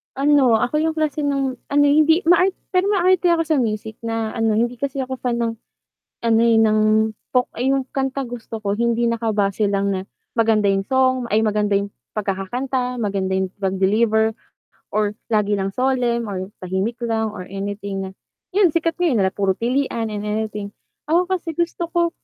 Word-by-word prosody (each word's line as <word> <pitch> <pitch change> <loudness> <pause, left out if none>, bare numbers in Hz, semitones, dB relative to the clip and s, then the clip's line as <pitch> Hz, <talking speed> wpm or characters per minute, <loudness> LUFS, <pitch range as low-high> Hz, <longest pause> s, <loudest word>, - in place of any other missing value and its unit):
ano 275 -4 +4
ako 245 +7 +1
yung 320 0 0
klase 310 -2 -1
ng 275 -3 -1
ano 290 0 +3
eh 285 0 +4
hindi 320 +2 +5
maar 350 +2 +6 0.2
pero 370 +1 +2
maarte 370 -2 +3
ako 330 -1 +2
sa 310 - +2
music 220 -2 -2
na 225 -1 -2
ano 225 -2 +1
hindi 240 +2 0
kasi 275 0 -3
ako 260 0 -6
fan 245 -2 -1
ng 230 -1 0 0.8
ano, 225 -1 +4
eh, 230 -1 +4
ng 215 -1 +4 0.5
folk 250 -1 +3
ay 255 +3 0
yung 270 -1 0
kantang 270 -1 -1
gusto 225 -1 -8
ko 200 -1 -1
hindi 235 +1 +1
nakabase 215 -3 0
lang 200 0 0
na 185 - -3 0.3
maganda 220 -2 +3
yung 195 0 +2
song 260 -1 +2
ay, 215 - +4
maganda 210 -1 0
yung 200 - -3 0.3
pagkakakanta, 245 +6 -2
maganda 195 -3 -1
yung 190 0 0 0.2
pag-deliver 215 +4 +2 0.6
or 210 -1 +2 0.2
lagi 210 -1 +2
lang 195 0 -2
solemn 245 -3 0
or 185 +1 -5
tahimik 190 +6 -2
lang 225 -2 -1
or 185 - -6
anything 195 0 -4
na - - -7 0.4
'yun 390 -4 +5
sikat 330 +1 0
ngayon 335 -10 +1
na 190 - -2
puro 195 -1 0
pilian 240 -1 0
and 210 -1 -4
anything. 210 -1 -3 0.4
Ako 335 +3 +3
kasi 350 -3 -2
gusto 340 +1 -1
ko, 340 -1 +2
230 Hz, 180 wpm, -21 LUFS, 210-275 Hz, 0.8 s, maar